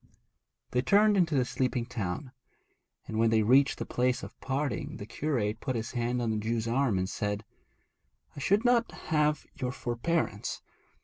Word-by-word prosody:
They 125 - +2
turned 205 +8 +5
into 170 -5 +2
the 130 -2 +3
sleeping 125 -1 -1
town; 120 +2 -4 0.7
but 110 - -6
when 115 0 +4
they 110 -1 +3
reached 130 +4 +4
the - - -4
place 125 0 0
of - - -10
parting 135 +1 -2
the 100 - -7
curate 115 -4 -1
put 130 +1 -2
his 115 0 -3
hand 120 0 -1
on 115 - 0
the 110 - 0
Jew's 110 +1 -1
arm 120 -3 +2
and 95 0 0
said, 105 +2 -3 0.9
'I - - -7
should 200 - +2
not 240 -1 +3
have 150 -1 0
your 125 -1 -3
forbearance. 120 -2 -2
125 Hz, 170 wpm, -29 LUFS, 110-145 Hz, 0.9 s, turned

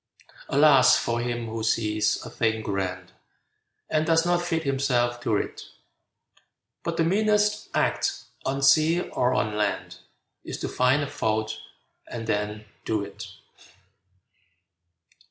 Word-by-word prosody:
Alas 140 -2 +6
for 115 0 -1
him 120 -1 -2
who 110 0 -5
sees 110 -1 0
a - - -7
thing 110 -2 0
grand 95 -3 -3 0.8
And 155 0 +1
does 165 0 +3
not 175 0 +2
fit 165 -2 -1
himself 125 -4 0
to 110 -3 +1
it! - - -5 1.2
But 170 -1 -3
the 165 - +3
meanest 210 +3 +1
act, - - 0 0.2
on 135 +1 -2
sea 155 +5 +5
or 125 +1 +1
on 110 -4 0
land, 105 -1 -2 0.4
Is - - -6
to - - -2
find 130 +4 +2
a - - -3
fault, 110 -2 -1 0.5
and 115 -1 -6
then 105 0 -2 0.2
do 110 -2 -1
it! - - -9
120 Hz, 130 wpm, -25 LUFS, 110-155 Hz, 1.2 s, Alas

